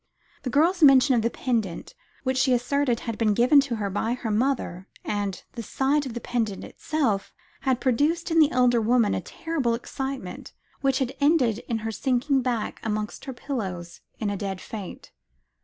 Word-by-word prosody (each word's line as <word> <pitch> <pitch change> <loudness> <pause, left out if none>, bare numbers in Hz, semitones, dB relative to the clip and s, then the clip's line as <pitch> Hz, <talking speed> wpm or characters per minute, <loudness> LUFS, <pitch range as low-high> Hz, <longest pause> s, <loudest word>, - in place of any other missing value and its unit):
The 255 - -3
girl's 335 +8 +2
mention 270 -2 +7
of 235 - +3
the 230 - +1
pendant 225 - -2 0.3
which 260 -1 0
she 260 0 +3
asserted 245 0 +1
had 230 -2 -5
been 215 -3 +2
given 255 +5 +6
her 235 -7 -2
by 225 +4 -1
her 235 -3 -4
mother; 210 -6 -1 0.2
and, 205 -2 -2
the 235 - -5
sight 275 +5 0
of 240 - -7
the - - -2
pendant 225 -4 -2
itself, 255 -11 -1 0.3
had 260 -3 0
produced 295 +7 +1
in 325 - +4
the 305 -2 +6
elder 250 -3 +3
woman 230 -1 +3
a - - -1
terrible 285 -8 -2
excitement, 265 -3 -6 0.3
which 270 -1 +2
had 265 -1 -1
ended 275 -7 +3
in 230 - 0
her 225 - -1
sinking 265 +3 +1
back 240 -4 -2
amongst 215 -1 -3
her 265 - -5
pillows 190 -11 -5 0.2
in 210 -2 -2
a - - -2
dead 195 -1 -4
faint. 205 -2 -8
245 Hz, 175 wpm, -25 LUFS, 220-275 Hz, 0.3 s, mention